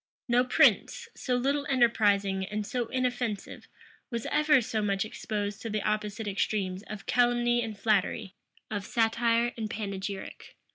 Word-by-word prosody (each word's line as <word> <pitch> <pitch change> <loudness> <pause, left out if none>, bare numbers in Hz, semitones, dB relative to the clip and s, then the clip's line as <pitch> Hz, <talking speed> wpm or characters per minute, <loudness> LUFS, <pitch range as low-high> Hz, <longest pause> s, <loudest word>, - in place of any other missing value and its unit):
No 245 0 +4
prince, 255 - +3
so 250 - -2
little 280 +3 0
enterprising 205 -7 +2
and 210 +2 -3
so 240 +2 -2
inoffensive, 245 -4 -3 0.4
was 235 -2 -4
ever 300 -1 +5
so 220 -2 -2
much 200 -1 0
exposed 205 -1 -4
to 225 - -4
the 210 -1 -2
opposite 210 0 -2
extremes 195 -2 -1
of 215 -2 -7
calumny 240 0 +2
and 220 -3 -5
flattery, 200 -2 0 0.4
of 205 -2 -2
satire 235 +1 +1
and 220 -2 -3
panegyric. 200 -2 -6
220 Hz, 140 wpm, -29 LUFS, 205-240 Hz, 0.4 s, ever